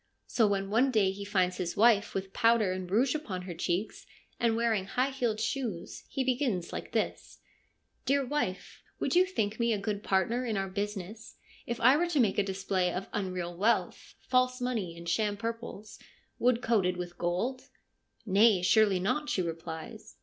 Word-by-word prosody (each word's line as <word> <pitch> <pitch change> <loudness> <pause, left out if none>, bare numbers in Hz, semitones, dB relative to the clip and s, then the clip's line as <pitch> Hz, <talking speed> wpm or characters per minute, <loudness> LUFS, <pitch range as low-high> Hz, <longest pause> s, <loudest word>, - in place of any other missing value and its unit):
So 225 -3 +2
when 195 -1 -1
one 245 +5 +4
day 210 -6 +3
he 200 +1 -7
finds 185 -3 0
his 175 -1 -3
wife 215 -2 +4
with 195 0 -4
powder 230 -4 +3
and 185 -1 -4
rouge 240 +7 +2
upon 200 -13 -4
her 180 -1 -6
cheeks, 175 +5 -3 0.3
and 230 -1 +2
wearing 225 -4 +1
high 255 +7 0
heeled 240 -5 -1
shoes, 225 -6 -3
he 270 - -1
begins 245 - -1
like - - -6
this: - - -2 0.3
' - - -45
Dear 275 0 +2
wife, 245 -9 -3 0.2
would - - 0
you 365 +1 +5
think 220 - -2
me 235 0 +2
a - - 0
good 205 0 -3
partner 210 +6 +1
in 225 -4 -2
our 195 0 -1
business 205 +2 -5 0.3
if 235 0 -3
I 255 +5 +6
were 350 +2 +1
to 330 -4 0
make 210 -5 +3
a - - +3
display 190 -2 -1
of 190 +2 -5
unreal 185 -4 -3
wealth, 210 +6 0
false 255 0 +2
money, 220 -9 -2
and 170 0 -9
sham 205 +4 0
purples, 230 -1 -6 0.4
wood 245 0 +2
coated 190 -6 +2
with 175 -1 -7
gold? 190 +10 -2 0.2
' - - -49
' - - -38
Nay, 205 -3 +5
surely 200 0 +4
not,' 295 +11 -1
she 185 - 0
replies. 165 -1 -7
210 Hz, 185 wpm, -30 LUFS, 185-240 Hz, 0.4 s, I